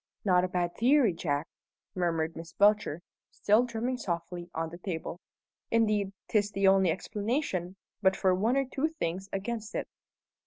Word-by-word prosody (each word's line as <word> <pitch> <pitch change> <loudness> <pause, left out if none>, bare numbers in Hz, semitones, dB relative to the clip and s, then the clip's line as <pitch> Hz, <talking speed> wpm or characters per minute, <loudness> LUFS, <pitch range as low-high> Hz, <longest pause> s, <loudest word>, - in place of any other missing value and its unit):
"Not 180 -2 +4
a - - +1
bad 175 -1 -1
theory, 250 -3 +4
Jack!" 150 -2 -2 0.5
murmured 165 -3 0
Miss 165 +1 -9
Belcher, 205 -5 +3 0.3
still 215 +4 +3
drumming 245 +2 -2
softly 175 -1 -4
on 160 0 -3
the 170 - -9
table. 175 -1 -5 0.5
"Indeed, 210 -3 +2 0.2
'tis 205 -2 +2
the 195 -1 +1
only 190 -1 +5
explanation, 200 - -2 0.3
but 190 -1 +4
for 190 -1 +2
one 220 +8 +2
or 275 - +2
two 270 +4 -1
things 180 +4 -2
against 215 +2 -4
it." - - -2
190 Hz, 155 wpm, -30 LUFS, 175-215 Hz, 0.5 s, only